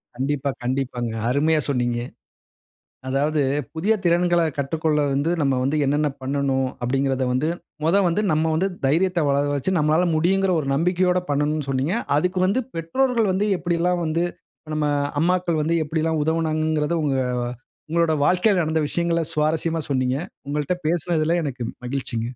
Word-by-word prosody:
கண்டிப்பா, 140 +2 -1
கண்டிப்பாங்க. 125 -2 -2 0.2
அருமையா 155 +4 +2
சொன்னீங்க. 120 -3 0 1.1
அதாவது, 145 +3 +1 0.3
"புதிய 200 +7 +2
திறன்கள 175 0 +3 0.2
கற்றுக்கொள்ள 155 +2 0
வந்து 145 +5 +1
நம்ம 135 -2 +2
வந்து 140 +3 0
என்னென்ன 145 +2 +1
பண்ணணும்?" 135 -1 0
அப்பிடீங்கிறத 135 +1 0
வந்து 130 +5 0 0.4
மொத 165 +5 +3
வந்து 175 +5 +1
நம்ம 155 +1 +2
வந்து 185 +5 +1 0.2
தைரியத்த 175 +5 +2
வளர 140 +1 +2
வச்சு 140 +7 -1
நம்மளால 155 +3 +3
முடியுங்கிற 190 +4 +2
ஒரு 140 - -4
நம்பிக்கையோட 180 +3 +2
பண்ணணும்ன்னு 150 0 0
சொன்னீங்க. 135 - 0 0.2
அதுக்கு 180 +4 0
வந்து 200 +7 +2 0.2
பெற்றோர்கள் 225 +6 +1
வந்து 200 +3 0
எப்பிடியெல்லாம் 175 0 0
வந்து 165 +2 0 0.5
நம்ம 155 -1 0 0.4
அம்மாக்கள் 175 -2 +1
வந்து 165 +2 +1
எப்பிடியெல்லாம் 160 0 -1
உதவுனாங்கங்கிறத, 155 0 0
உங்க 140 -2 +1 0.7
உங்களோட 165 0 +2
வாழ்க்கையில 185 +1 +3
நடந்த 160 0 0
விஷயங்கள 170 0 0
சுவாரஸ்யமா 160 +2 0
சொன்னீங்க. 130 -1 +1 0.3
உங்கள்ட்ட 150 +4 -1
பேசினதில 170 0 +1
எனக்கு 130 -4 -4 0.2
மகிழ்ச்சிங்க. 125 -3 -2
155 Hz, 135 wpm, -23 LUFS, 140-170 Hz, 1.1 s, திறன்கள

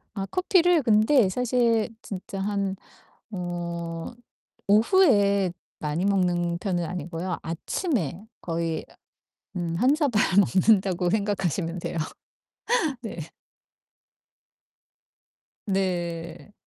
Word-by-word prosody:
아 195 -2 -2
커피를 355 -3 +4
근데 220 +2 +4
사실 235 0 +1
진짜 195 0 -7
한 200 -1 -1 0.5
어 170 -2 -5 0.5
오후에 205 - +4 0.3
많이 155 +4 -1
먹는 175 -3 +1
편은 175 -3 -1
아니고요 175 +1 -4
아침에 180 - -2
거의 165 -1 -3
어 - - -19 0.6
음 170 -2 -2
1 265 +4 +4
사발 275 -9 +2 0.2
먹는다고 190 -2 +3
생각하시면 190 -4 -1
돼요. 170 - -4 1.0
네. 220 -7 -6 2.5
네. 175 -1 -3
190 Hz, 170 characters per minute, -25 LUFS, 175-220 Hz, 2.5 s, 커피를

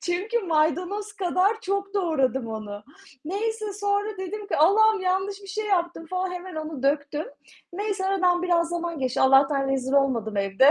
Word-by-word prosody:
Çünkü 385 +7 -1
maydanoz 360 +4 0
kadar 385 +3 +1
çok 395 0 -2
doğradım 270 - +1
onu. 210 -2 -6 0.4
Neyse 430 +4 -2
sonra 405 +1 -1
dedim 400 +2 -5
ki, - - -1
"Allah'ım 420 +7 +5
yanlış 380 +2 -1
bir 395 - -12
şey 430 +1 -3
yaptım." 345 -4 -1
falan, 370 +1 -2
hemen 360 0 -7
onu 310 -3 -5
döktüm. 285 +2 0 0.5
Neyse 395 0 -2
aradan 365 -2 +2
biraz 340 -2 +2
zaman 340 -2 -3
geçti. 260 0 -1
Allah'tan 270 +1 +4
rezil 265 0 -1
olmadım 240 -7 +1
evde. 200 +8 +4
355 Hz, 155 wpm, -25 LUFS, 285-400 Hz, 0.5 s, Allah'ım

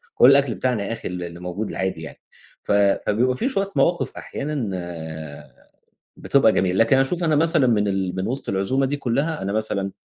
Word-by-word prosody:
كل 125 - +7
الأكل 140 -4 +3
بتاعنا 125 -5 -1
يا 115 - -3
أخي - - -6
ال 90 -1 -5
اللي 85 0 -8
موجود 90 +4 -4
العادي 95 0 -3
يعني. - - -10 0.4
ف - - -3
فبيبقى 105 +5 +2
في 260 - 0
شوية 200 -6 -2
مواقِف 170 +5 +1
أحيانًا 140 -7 -4 1.5
بتبقى 135 -6 +3
جميلة، 95 -2 +1
لكن 115 +4 +4
أشوف 170 +7 0
أنا 155 -2 +2
مثلًا 155 -3 +3
من 105 -4 +2
ال 95 -2 -2
من 95 - -2
وِسط 130 +2 -4
العزومة 100 +8 0
دي 145 +2 -2
كُلّها، 140 +3 -1
أنا 100 - -2
مثلًا 100 -2 -1
115 Hz, 185 wpm, -22 LUFS, 100-140 Hz, 1.5 s, كل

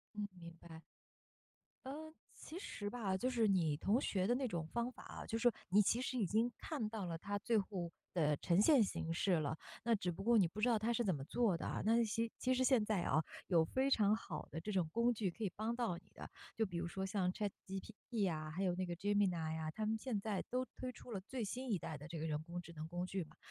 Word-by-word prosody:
嗯， 205 -1 -2
明 170 -1 -9
白。 160 -1 -11 1.0
呃， 315 +4 -6 0.2
其 335 - -8
实 205 - -4
吧， 205 -5 -1
就 255 +6 0
是 230 -3 +3
你 170 -7 +3
同 215 - +2
学 190 -2 +1
的 245 - +3
那 265 0 0
种 170 -7 -3
方 235 +6 -1
法 - - -12
啊， - - -7
就 225 - -1
说 240 0 +4 0.2
你 205 +3 +6
其 230 +4 +2
实 255 0 -2
已 215 - +2
经 225 +6 +2
看 255 -9 -3
到 215 -4 -3
了 165 -1 -3
他 205 +4 -3
最 225 +2 +2
后 190 -4 -2 0.2
的 150 -4 +3
呈 175 +3 +3
现 270 -1 +7
形 165 -4 -2
式 185 +3 +2
了， 155 -2 +1 0.3
那 235 - +4
只 180 -4 -1
不 165 - -6
过 235 +2 +5
你 195 - +6
不 185 +6 -8
知 230 - +3
道 235 - +4
他 220 +2 0
是 235 -1 +1
怎 185 - +2
么 135 - -5
做 215 - +2
的 - - -5
啊。 - - -2
那 230 +2 +5
其 225 +1 0
其 255 - +2
实 260 0 +3
现 255 -4 +5
在 210 -3 +1
啊， 155 -1 +2 0.2
有 170 -4 +5
非 260 +11 +1
常 210 -6 +5
好 - - -5
的 160 - -3
这 205 +5 -4
种 175 -4 +1
工 235 +5 +3
具 205 -5 -1
可 225 - -15
以 205 - +1
帮 220 +2 -1
到 235 -8 -1
你 - - -17
的， - - -8 0.3
就 225 - +3
比 180 -4 -7
如 170 - -1
说 190 +3 -3
像 190 -2 +1
ChatGPT 205 +1 -3
啊， 155 -1 -3
还 180 +5 -2
有 180 -2 +2
那 185 0 -1
个 175 - -3
Gemini 185 -5 +2
呀， 155 -1 -2
他 215 +5 -2
们 220 +1 +1
现 220 -2 -2
在 200 -1 -1
都 255 +1 0
推 255 - -4
出 245 - -12
了 195 - -3
最 235 +3 -3
新 250 +5 -3
一 190 - +2
代 155 - -5
的 150 +4 -10
这 165 0 -4
个 155 - -2
人 150 0 -1
工 175 +2 -5
智 170 - -11
能 155 0 -6
工 175 +1 -2
具 185 -1 -2
嘛。 155 0 -17
205 Hz, 305 characters per minute, -38 LUFS, 175-230 Hz, 1.0 s, 现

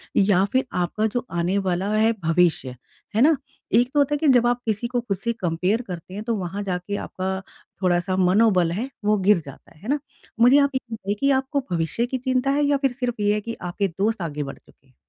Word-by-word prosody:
या 195 -2 +4
फिर 260 +1 +2 0.2
आपका 210 +5 -1
जो 245 0 -1
आने 175 +3 0
वाला 190 0 -1
है 220 +1 +3
भविष्य, 165 -6 +1 0.4
है 220 - +3
ना? 310 +4 +6 0.4
एक 240 +3 +4
तो 295 - +3
होता 285 +1 +2
है - - 0
कि 305 - 0
जब 240 -1 +4
आप 245 0 0
किसी 220 +1 -1
को 245 0 -1
ख़ुद 205 -5 -3
से 235 +5 -2
कंपेयर 185 +2 0
करते 180 0 -7
हैं 205 +2 -5
तो 230 0 -1
वहाँ 195 +1 -4
जाके 185 +1 -3
आपका 190 -1 -3 0.4
थोड़ा-सा 180 0 +1
मनोबल 185 -2 +3
है 225 +10 -3 0.2
वो 210 0 +3
गिर 200 0 +4
जाता 140 -1 -13
है, - - -21
है 215 - -8
ना? 290 +1 +2 0.4
मुझे 245 +4 +7
आप 280 0 +3
ये - - +2
बताइए 205 -2 -3
कि 280 0 +3
आपको 265 +1 +1
भविष्य 170 +7 0
की 260 +2 -3
चिंता 255 +1 0
है 290 +1 +2
या 285 0 +3
फिर 270 -1 +1
सिर्फ़ 245 -3 -3
ये 205 0 +3
है 210 - -1
कि 230 +2 -6
आपके 180 +3 -1
दोस्त 200 +5 -1
आगे 150 -3 -3
बढ़ 135 - -7
चुके 135 - -25
हैं? 130 - -29
205 Hz, 235 wpm, -23 LUFS, 180-245 Hz, 0.4 s, मुझे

